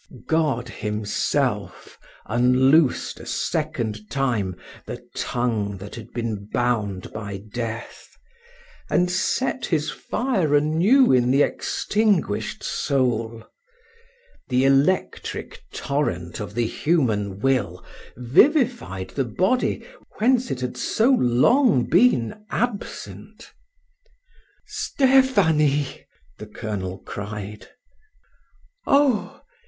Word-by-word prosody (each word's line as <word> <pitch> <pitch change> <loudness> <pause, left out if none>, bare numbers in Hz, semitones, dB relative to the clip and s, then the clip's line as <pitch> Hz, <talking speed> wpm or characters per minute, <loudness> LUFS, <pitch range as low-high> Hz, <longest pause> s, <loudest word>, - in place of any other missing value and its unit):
God 150 -7 0
Himself 105 -2 -2 0.3
unloosed 125 +5 +3
a - - -10
second 115 -9 -2
time 115 -9 -1 0.3
the - - -8
tongue 110 -5 -1
that 100 +2 -10
had 115 - -9
been 110 -4 -4
bound 105 -6 -1
by 100 -2 -5 0.2
death, 115 -1 -5 0.8
and 180 0 +2
set 260 +8 -1
His 155 -2 0
fire 200 - 0
anew 170 - +4
in 125 -1 +3
the 140 +3 +4
extinguished 205 - 0
soul. 115 -4 -1 1.1
The 130 +1 +2
electric 135 +7 0
torrent 90 - -2
of 105 -1 -6
the 120 -1 +1
human 110 - 0
will 115 -8 0 0.3
vivified 140 - +2
the 135 - -1
body 185 - 0 0.3
whence 250 +2 +2
it 130 - -3
had 125 -1 -4
so 230 +5 +2
long 150 - +4
been 180 - +2
absent. 240 -4 -5 1.1
"Stephanie!" 180 - +2 0.3
the 105 - -8
colonel 105 -4 -5
cried. 105 0 -7 1.2
"Oh! 275 -6 +2
130 Hz, 90 wpm, -23 LUFS, 110-180 Hz, 1.2 s, anew